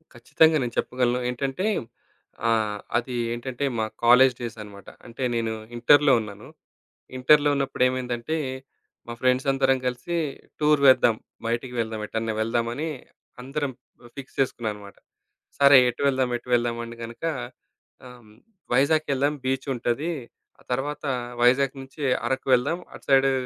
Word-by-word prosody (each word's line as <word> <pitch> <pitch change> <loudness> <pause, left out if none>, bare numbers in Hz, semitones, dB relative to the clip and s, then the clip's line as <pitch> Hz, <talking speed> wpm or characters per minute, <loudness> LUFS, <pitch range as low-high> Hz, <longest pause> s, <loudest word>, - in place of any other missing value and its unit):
ఖచ్చితంగా. 155 +6 +3
నేను 120 -1 -4
చెప్పగలను. 125 -1 0
ఏంటంటే, 135 +8 -2 0.8
ఆహ్, 110 -2 0 0.2
అది 125 +1 -3 0.2
ఏంటంటే, 125 +3 -4
మా 110 - +1 0.2
కాలేజ్ 125 +2 +7
డేస్ 115 -2 -5
అన్నమాట. 100 -1 -12 0.2
అంటే 120 +3 -6
నేను 115 -1 -1 0.2
ఇంటరులో 145 +3 +5
ఉన్నాను. 105 +3 -10 0.7
ఇంటరులో 145 +3 +5
ఉన్నప్పుడు 135 -2 0
ఏమైందంటే, 125 +4 -3 0.7
మా 120 - -5
ఫ్రెండ్స్ 130 +2 +2
అందరం 135 0 +2
కలిసి, 125 +8 -3 0.4
టూర్ 150 -1 +4
వేద్దాం, 120 -3 +5 0.3
బయటికి 120 +2 -2
వెళ్దాం 110 -1 -2
ఎటన్నా 110 0 -2
వెళ్దామని, 120 +6 -1 0.5
అందరం 140 +1 -3 0.5
ఫిక్స్ 135 -1 -10
చేసుకున్నామన్నమాట. 105 -6 -3 0.6
సరే, 140 -1 +8
ఎటు 120 - -6
వెళ్దాం, 130 -2 +1
ఎటు 125 - -16
వెళ్దాం, 120 -1 0
అంటే 115 0 -10
గనుక 115 +6 -8 0.8
హ్మ్. 120 -4 -14 0.4
వైజాగ్‌కెళ్దాం 140 +1 +2
బీచ్ 130 0 -1
ఉంటది. 120 +7 -1 0.5
ఆ - - -21
తరువాత 145 +4 -2 0.4
వైజాగ్ 130 +3 +3
నుంచి 135 +3 -9 0.2
అరకు 130 +2 -2
వెళ్దాం. 140 +8 +2
అటు - - -13
సైడు 135 0 +5
125 Hz, 130 wpm, -25 LUFS, 120-140 Hz, 0.8 s, సరే